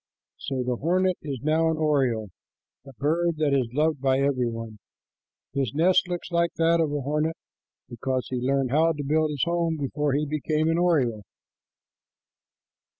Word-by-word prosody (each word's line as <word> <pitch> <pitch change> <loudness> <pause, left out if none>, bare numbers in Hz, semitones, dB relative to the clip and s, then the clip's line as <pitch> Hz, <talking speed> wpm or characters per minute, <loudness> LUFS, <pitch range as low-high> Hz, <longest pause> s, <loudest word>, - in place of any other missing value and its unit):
'" - - -67
So 130 -2 -1
the 125 -1 -1
hornet 185 +5 +1
is 140 -5 -5
now 160 +2 +2
an 160 - -1
oriole, 130 -9 +1 0.6
a 135 - -11
bird 165 +4 +1
that 150 -2 +1
is 130 -4 +1
loved 150 +1 0
by 135 -1 +2
every 135 -3 +1
one. 115 -2 -7 0.7
His 135 -3 -1
nest 180 +4 +3
looks 175 0 -5
like 170 -1 +2
that 165 +1 +3
of 155 -3 0
a 145 -1 -2
hornet 150 +4 -1 0.5
because 130 +1 -3
he 130 - -1
learned 130 +1 0
how 160 +3 +3
to 145 -2 -5
build 155 +2 +1
his 145 -3 -1
home 170 -1 0
before 145 0 -1
he 150 +2 +1
became 155 +1 0
an 165 +1 +1
oriole. 135 -11 +2
150 Hz, 170 wpm, -25 LUFS, 130-165 Hz, 0.7 s, nest